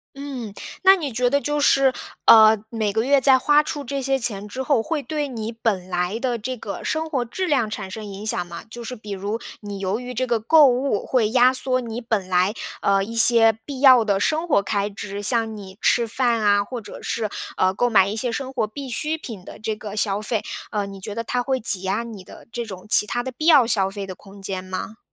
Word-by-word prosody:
嗯， 265 -7 -6 0.3
那 385 0 +7
你 290 -8 -4
觉 245 +2 +1
得 280 - +2
就 295 0 -1
是， 275 -2 +4 0.3
呃， 220 -1 +8
每 220 -3 -1
个 220 +2 0
月 280 +1 +4
在 265 0 +6
花 295 +3 +4
出 290 -2 -5
这 275 +2 -3
些 270 +1 +1
钱 210 -4 -2
之 260 +6 -4
后， 265 -4 +2
会 310 +2 -2
对 300 -2 -3
你 225 -2 -5
本 215 -5 -2
来 180 +5 -1
的 245 -2 -1
这 255 +4 -4
个 205 -3 -7
生 315 0 -2
活 260 -5 0
质 370 +11 -3
量 260 -9 +1
产 190 -3 -6
生 215 +2 -7
影 200 +1 -8
响 175 -4 0
吗？ 170 -1 -9
就 235 +2 -9
是 250 +2 -6
比 210 -1 -11
如， 200 +3 -3 0.2
你 205 -2 -7
由 195 +4 -2
于 250 0 -7
这 255 +2 -1
个 235 -3 0
购 300 +6 +6
物 255 -3 0
会 225 -5 +1
压 250 +1 +5
缩 255 0 -1
你 235 0 -5
本 220 -5 -2
来， 185 +3 +2 0.3
呃， 195 -1 +2
一 230 +3 -8
些 230 -1 +6
必 275 -3 -6
要 255 -4 +7
的 200 -2 +1
生 315 - 0
活 200 -10 +3
开 200 0 -1
支， 200 0 -7
像 225 0 +1
你 190 -2 -11
吃 235 -1 +3
饭 235 0 0
啊， 205 -1 +3
或 240 +2 -6
者 205 - -11
是， 220 -2 -2 0.3
呃， 185 0 +2
购 245 +4 +1
买 195 -3 +5
一 210 - -4
些 240 +1 -1
生 265 +1 -4
活 220 - 0
必 265 +6 -8
需 305 +6 -2
品 215 -11 -9
的 - - -11
这 215 0 -3
个 210 -1 -8
消 205 -1 0
费。 215 0 -2 0.3
呃， 205 -2 -1
你 195 0 -9
觉 205 +2 -6
得 230 - -3
它 245 +1 -1
会 260 0 -1
挤 200 -4 -1
压 190 +4 -1
你 215 -5 -9
的 - - -14
这 240 0 -4
种 190 -4 -9
其 210 - +4
它 240 +3 -2
的 260 - -5
必 255 +5 -7
要 290 -8 +7
消 195 -4 +1
费 200 0 -6
的 190 - -7
空 195 +2 -15
间 190 -1 -4
吗？ 185 +4 -6
225 Hz, 260 characters per minute, -22 LUFS, 205-260 Hz, 0.3 s, 呃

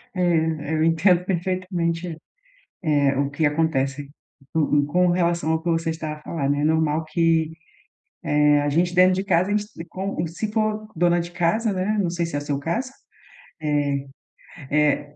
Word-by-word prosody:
É, 160 -4 0
eu 155 - +1
entendo 170 +2 +3
perfeitamente, 180 -2 -2 0.7
eh, 145 -3 +2
o 140 0 0
que 145 +3 -1
acontece 145 -2 0 0.4
com 150 -2 +2
com 180 +4 +2
relação 170 -2 +1
ao 160 0 0
que 175 - -3
você 165 0 0
está 160 -1 -4
a 150 - -11
falar, 150 -3 -3
né. 145 0 +1
É - - 0
normal 160 0 +1
que, 160 -1 +1 0.9
eh, 150 0 +5
a 145 - 0
gente 175 +4 +1
dentro 185 +1 +5
de 190 +1 -2
casa, 185 -1 +2
a 205 - +2
gente 210 0 -2 0.2
com 185 -1 -3
se 205 +6 -4
for 215 -1 -1
dona 175 +1 +2
de 170 0 -5
casa, 190 +6 +1
né, 195 +3 -1
não 180 -4 0
sei 170 0 -1
se 165 - -4
é - - -1
seu 145 -1 -2
caso, 195 - -2 0.7
eh 145 -2 0 0.8
eh, 145 0 +1
165 Hz, 175 wpm, -23 LUFS, 150-180 Hz, 0.9 s, eh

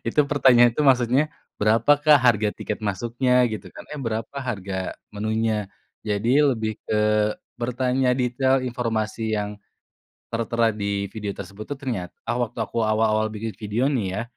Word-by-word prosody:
Itu 140 +5 +2
pertanyaan 120 -5 +5
itu 150 - +2
maksudnya, 130 +3 +3 0.2
"Berapakah 140 +7 +4
harga 110 -4 +3
tiket 105 0 -5
masuknya?" 120 +5 +1
gitu 110 -1 -7
kan, - - -11
eh, 150 - -7
"Berapa 115 0 -4
harga 95 -6 -3 0.2
menunya?" 110 -1 -1 0.3
Jadi 115 +8 +2
lebih 110 -6 0
ke 105 0 +2 0.2
bertanya 125 +1 0
detail 130 +1 +1
informasi 115 -3 -2
yang 105 0 -4 0.7
tertera 115 0 +1
di 100 -1 -2
video 105 -2 -4
tersebut 105 +2 -8
tuh 145 -1 -5
ternyata 110 -10 -4 0.2
waktu 120 -1 -1
aku 115 - -1
awal-awal 110 0 +2
bikin 110 0 -5
video 110 +4 -1
nih 120 -9 0
ya, - - -1
115 Hz, 140 wpm, -24 LUFS, 105-125 Hz, 0.7 s, pertanyaan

